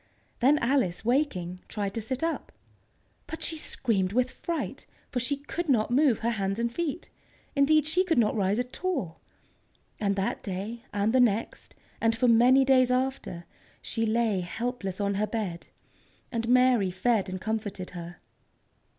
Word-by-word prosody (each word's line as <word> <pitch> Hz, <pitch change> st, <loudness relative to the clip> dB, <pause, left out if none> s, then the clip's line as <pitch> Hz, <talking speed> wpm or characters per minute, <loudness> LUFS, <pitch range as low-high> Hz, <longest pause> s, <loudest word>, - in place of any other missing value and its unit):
Then 275 Hz, +5 st, +5 dB
Alice, 235 Hz, -9 st, +1 dB
waking, 205 Hz, -, 0 dB
tried 200 Hz, -2 st, -3 dB
to 225 Hz, -, -2 dB
sit 260 Hz, +6 st, -3 dB
up. 330 Hz, 0 st, -2 dB, 0.8 s
But 320 Hz, -, -6 dB
she 325 Hz, -, -2 dB
screamed 205 Hz, -10 st, -1 dB
with 250 Hz, +2 st, +2 dB
fright, 335 Hz, -2 st, -4 dB, 0.2 s
for 250 Hz, -, 0 dB
she 275 Hz, +4 st, -1 dB
could 315 Hz, +4 st, -5 dB
not 235 Hz, -4 st, +2 dB
move 260 Hz, -3 st, +4 dB
her 235 Hz, +1 st, -1 dB
hands 195 Hz, -2 st, -1 dB
and 235 Hz, 0 st, -1 dB
feet. 340 Hz, +1 st, -3 dB, 0.5 s
Indeed, 295 Hz, +2 st, +4 dB
she 340 Hz, +4 st, +2 dB
could 340 Hz, -4 st, 0 dB
not 230 Hz, -2 st, +3 dB
rise 200 Hz, 0 st, +1 dB
at 250 Hz, +7 st, -4 dB
all! 265 Hz, -, -2 dB, 0.8 s
And 200 Hz, -2 st, +1 dB
that 195 Hz, 0 st, -1 dB
day, 205 Hz, +5 st, -5 dB
and 205 Hz, +2 st, 0 dB
the 260 Hz, -, +5 dB
next, 230 Hz, -3 st, 0 dB, 0.3 s
and 225 Hz, 0 st, +2 dB
for 250 Hz, -, +3 dB
many 245 Hz, +3 st, +6 dB
days 255 Hz, -1 st, +5 dB
after, 250 Hz, -9 st, -1 dB, 0.3 s
she 225 Hz, -1 st, -2 dB
lay 220 Hz, -3 st, +1 dB
helpless 195 Hz, +1 st, -4 dB
on 200 Hz, 0 st, 0 dB
her 210 Hz, +2 st, 0 dB
bed, 200 Hz, -7 st, -4 dB, 0.6 s
and 230 Hz, -1 st, -2 dB
Mary 250 Hz, -5 st, +4 dB
fed 195 Hz, +2 st, +1 dB
and 185 Hz, 0 st, -4 dB
comforted 210 Hz, -3 st, -4 dB
her. 175 Hz, 0 st, -8 dB
230 Hz, 160 wpm, -28 LUFS, 200-260 Hz, 0.8 s, many